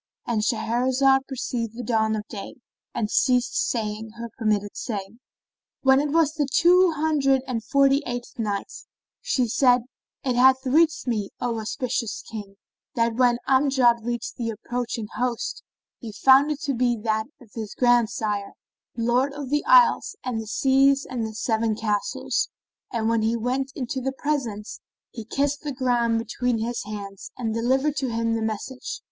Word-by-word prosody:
—And 230 -3 0
Shahrazad 255 +4 +2
perceived 240 -4 -3
the 245 - -4
dawn 220 -1 +1
of 215 0 -5
day 200 -4 -8 0.4
and 215 - -1
ceased 250 -1 +2 0.2
saying 220 -1 -3
her 235 -1 -6
permitted 210 -3 -1
say. 205 -1 -5 0.6
When 265 0 +6
it 295 +1 0
was 315 0 +2
the 295 -3 -1
Two 360 +4 +5
Hundred 290 -4 +2
and 240 -4 -3
Forty 275 +4 +3
eighth 245 0 -6
Night, 205 -3 -2 0.5
She 250 -2 0
said, 245 +1 +3 0.4
It 255 -2 0
hath 260 +2 +5
reached 320 +5 +3
me, 215 -5 -1
O 235 -2 -2
auspicious 235 0 -3
King, 205 -3 -8 0.4
that 230 0 +1
when 245 -1 +3
Amjad 260 -4 +3
reached 240 0 -4
the 235 -2 -2
approaching 235 +1 -4
host, 250 - -2 0.4
he 230 - -7
found 265 +7 +5
it 300 -1 -3
to 280 - -1
be 240 -1 +1
that 220 -1 0
of 240 -6 -18
his 220 -3 -6
grandsire, 220 -4 +1 0.4
Lord 245 +4 +1
of 285 -2 -6
the 295 0 +1
Isles - - +5
and 240 -3 -2
the 220 - -9
Seas 270 +3 +3
and 240 -4 -3
the 220 - -9
Seven 220 -1 0
Castles; 210 -2 -1 0.4
and 225 -2 -1
when 230 -1 +2
he 225 +2 +1
went 260 +4 -1
into 260 0 -3
the 265 +1 -2
presence, 255 -8 -3 0.3
he 225 -2 -8
kissed 285 +5 -1
the 295 - -4
ground 245 -3 +1
between 235 +1 -1
his 230 +1 -3
hands 200 -2 -7
and 225 -3 -2
delivered 265 +6 +1
to 265 -2 -1
him 230 0 0
the 225 - -1
message. 255 - -4
245 Hz, 165 wpm, -24 LUFS, 225-270 Hz, 0.6 s, When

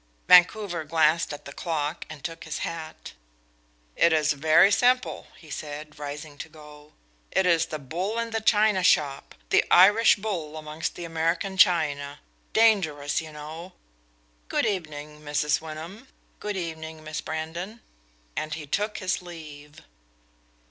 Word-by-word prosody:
Vancouver 180 -1 +5
glanced 160 +1 +2
at 145 - -8
the 140 - -9
clock 160 -1 -3
and 155 -3 -10
took 165 -1 -6
his 155 -1 -3
hat. 160 -1 -7 0.8
"It 170 - +4
is 155 -1 +3
very 155 +7 +5
simple," 250 +4 +2
he 155 -3 -15
said, 150 +1 -7
rising 145 0 -7
to 160 - -7
go. 150 -1 -15 0.4
"It 190 - +1
is 165 -2 +3
the 155 - -4
bull 175 - -4
in 230 0 -2
the 225 0 -1
china 215 -2 +3
shop 145 -6 +1 0.2
the - - +5
Irish 205 +6 +7
bull 175 -7 -4
amongst 155 +1 -4
the 175 - -6
American 165 +4 -1
china 150 -7 +2 0.3
dangerous, 160 -12 +2
you 160 -1 -10
know. 155 +4 -9 0.8
Good - - +1
evening, 150 -6 -4
Mrs. 150 0 0
Wyndham; 160 +10 -9 0.3
good 210 -1 -4
evening, 160 -2 -6
Miss 155 -1 -5
Brandon." 170 +7 -5 0.6
And 155 0 -3
he 155 -2 -7
took 210 +8 -2
his 185 -1 -1
leave. 155 -3 -11
160 Hz, 140 wpm, -26 LUFS, 150-185 Hz, 0.8 s, Irish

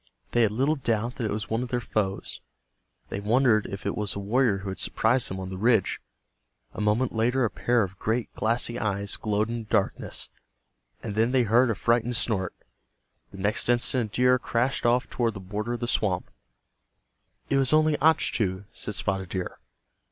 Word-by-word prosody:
They 120 - +3
had 110 -3 +3
little 135 +8 +1
doubt 120 -1 -1
that 120 - -2
it - - -3
was 110 +2 -3
one 115 +2 -1
of 125 - -4
their 125 - 0
foes. 105 -4 -2 0.7
They 100 - -3
wondered 110 +1 +3
if 100 - -7
it - - -1
was 105 -1 -2
the - - -5
warrior 110 +1 +2
who 100 0 -6
had 95 - -6
surprised 120 +3 +1
them 95 - -5
on 95 0 -6
the 95 - -6
ridge. 115 -2 +2 0.7
A - - -5
moment 110 +5 +1
later 120 +3 +2
a 110 - -1
pair 120 +2 +2
of 95 0 -7
great 115 +2 -1
glassy 115 +1 0
eyes 100 -1 -1
glowed 105 0 -1
in 120 - -2
the 110 -2 -10
darkness, 105 -4 -1 0.7
and 110 - -4
then 115 +4 +1
they 130 -2 +4
heard 120 +3 +4
a 110 - +1
frightened 120 +2 +1
snort. 105 -5 0 0.7
The - - -12
next 100 +4 0
instant 120 -2 +1
a - - -7
deer 125 0 +4
crashed 120 +1 0
off 125 +2 +2
toward 115 -3 -1
the - - -6
border 105 +5 -4
of 120 - -5
the 120 - -1
swamp. 95 -6 0 1.2
"It 140 - +4
was 135 -1 +3
only 155 0 +4
Achtu," 105 - +2
said 105 - -5
Spotted 95 -2 -2
Deer. 95 -1 -4
115 Hz, 195 wpm, -26 LUFS, 100-120 Hz, 1.2 s, they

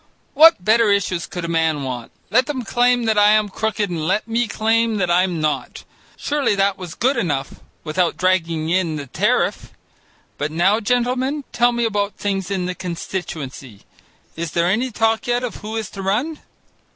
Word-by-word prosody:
What 315 - +6
better 225 0 +4
issues 180 -3 0
could 175 -1 -5
a - - -3
man 160 -3 0
want? 125 -3 -5 0.2
Let 255 +4 +3
them 270 -4 -3
claim 245 +1 +2
that 220 -2 +2
I 205 +1 +6
am 215 -1 +2
crooked 215 0 -1
and 165 -3 -3
let 210 - 0
me 230 +1 0
claim 225 +1 +1
that 180 -3 0
I'm 180 -1 +2
not. 155 -1 -2 0.3
Surely 285 -7 0
that 195 0 +2
was 180 -3 -8
good 260 +3 +1
enough 145 -11 -2 0.2
without 170 +2 0
dragging 165 -4 0
in 175 -3 +1
the 145 -2 -5
tariff. 125 - 0 0.7
But 145 - -1
now, 190 +7 +2
gentlemen, 250 +5 0
tell 240 +1 +3
me 235 -1 0
about 205 -2 -1
things 195 -2 -2
in 190 -2 -1
the 180 - -2
constituency. 160 - -6 0.5
Is 165 -1 -5
there 170 0 +2
any 220 +9 +1
talk 225 0 0
yet 245 +1 0
of 245 - -4
who 215 +1 -7
is 220 -2 -4
to 195 - -7
run?" 245 +12 -1
200 Hz, 180 wpm, -20 LUFS, 170-230 Hz, 0.7 s, What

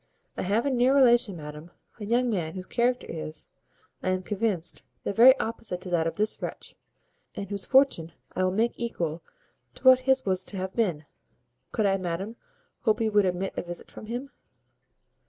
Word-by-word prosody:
I - - -3
have 210 +6 +1
a 280 - +1
near 255 +2 +3
relation, 240 -7 +4
madam, 150 +1 -9 0.3
a 210 - -5
young 245 +3 +2
man 170 -5 -2
whose 185 -1 -5
character 245 +4 0
is, 155 -1 -3 0.5
I - - -1
am 185 0 0
convinced, 200 -4 -2 0.2
the - - -2
very 255 +5 +8
opposite 225 -5 -3
to 180 - -7
that 165 -2 +2
of 165 - -3
this 215 +3 -1
wretch, - - -6 0.6
and 200 - -5
whose 200 -1 -4
fortune 260 - +3 0.2
I 185 - +1
will 185 - +2
make 225 +5 +1
equal 170 -9 -3 0.5
to - - -15
what 260 -1 +8
his 265 0 +4
was 190 -1 +1
to 200 - -6
have 185 0 -4
been. 175 -10 0 0.7
Could 220 - 0
I, 195 -1 +3
madam, 185 +4 -4 0.4
hope 220 -3 +1
you 220 -1 +1
would 205 -1 +4
admit 185 +1 -1
a - - -1
visit 175 0 -8
from 215 - -10
him?" 250 +5 -5
200 Hz, 190 wpm, -27 LUFS, 180-235 Hz, 0.7 s, very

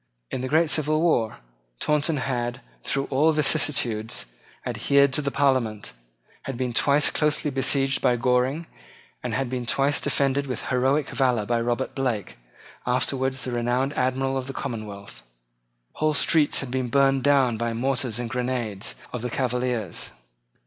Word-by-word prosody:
In - - -3
the 130 - -2
great 160 +3 +3
civil 155 0 +1
war 140 -10 +1 0.4
Taunton 150 +1 +1
had, 120 -2 -2 0.2
through 135 0 -1
all 150 +4 +4
vicissitudes, 130 -7 +1 0.4
adhered 140 -1 +3
to 150 - +3
the 140 - -1
Parliament, 125 - 0 0.5
had 135 -3 -4
been 125 -1 -2
twice 145 +4 +3
closely 150 -1 +1
besieged 135 +1 +1
by 125 - +3
Goring, 125 +6 +1 0.6
and - - -3
had 135 0 -1
been 125 -1 -4
twice 140 +3 +2
defended 140 0 +1
with 125 -3 -4
heroic 135 +3 +2
valour 125 -5 +1
by 115 +2 0
Robert 120 +2 -1
Blake, 120 - -2 0.5
afterwards 130 +1 0
the 125 - -3
renowned 120 +3 0
Admiral 135 0 0
of 130 0 -4
the 135 - -5
Commonwealth. 110 -7 -6 0.7
Whole 155 -1 0
streets 150 0 +3
had 135 -3 -6
been 130 -1 -1
burned 135 +1 +3
down 135 -4 +3
by 115 +1 -1
the 115 - -4
mortars 125 -2 -1
and 120 -1 -3
grenades 120 -5 -2 0.2
of 125 - -3
the 125 - -3
Cavaliers. 125 -5 -2
130 Hz, 155 wpm, -25 LUFS, 120-140 Hz, 0.7 s, all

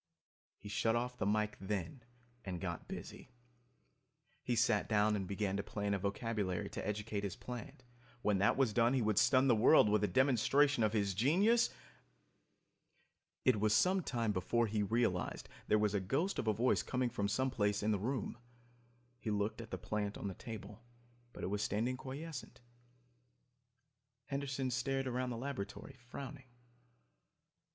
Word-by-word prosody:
He 100 - -11
shut 115 +2 +1
off 125 +1 -1
the 95 - 0
mike, 105 0 +1
then, 95 +3 -3 0.4
and 90 -3 -4
got 85 -3 -5
busy. - - -8 1.1
He 120 - -1
sat 115 -3 +2
down 105 0 +3
and 95 -2 -3
began 100 0 -1
to - - 0
plan 100 0 -2
a 100 - 0
vocabulary 100 -2 -2
to - - -5
educate 105 0 -2
his 100 -3 -3
plant. 125 +1 -8 0.4
When 105 -2 +2
that 100 - +3
was 130 -6 +2
done 120 +3 +3
he 130 - +2
would 105 -1 +3
stun 130 +3 +4
the 120 - +5
world 110 +1 +6
with 105 0 +2
a - - +3
demonstration 130 +2 +3
of 110 0 +2
his 100 -3 +1
genius... 185 - +4 1.8
It 125 -5 +4
was 105 +1 +3
some 185 +6 +4
time 115 -8 -1
before 105 +5 +1
he 105 -1 -1
realized 105 -3 0 0.2
there 105 - +4
was 105 -1 +1
a 100 - +2
ghost 140 - -1
of - - -2
a - - +5
voice 115 +5 +2
coming 125 -2 -1
from 100 -2 -1
someplace 105 -3 0
in 110 - +2
the 105 - +1
room. 120 +1 -3 0.8
He 115 - -4
looked 105 +2 -1
at 115 - -10
the - - -4
plant 105 -1 -3
on - - -4
the 95 - -3
table, 105 -2 -8 0.5
but - - -9
it 95 - -2
was 105 0 -1
standing 115 +6 0
quiescent. 140 +2 -7 1.7
Henderson 135 -2 -2
stared 135 +2 -1
around 125 0 -1
the 120 - -4
laboratory, 135 0 -5
frowning. 135 0 -8
110 Hz, 165 wpm, -35 LUFS, 105-130 Hz, 1.8 s, world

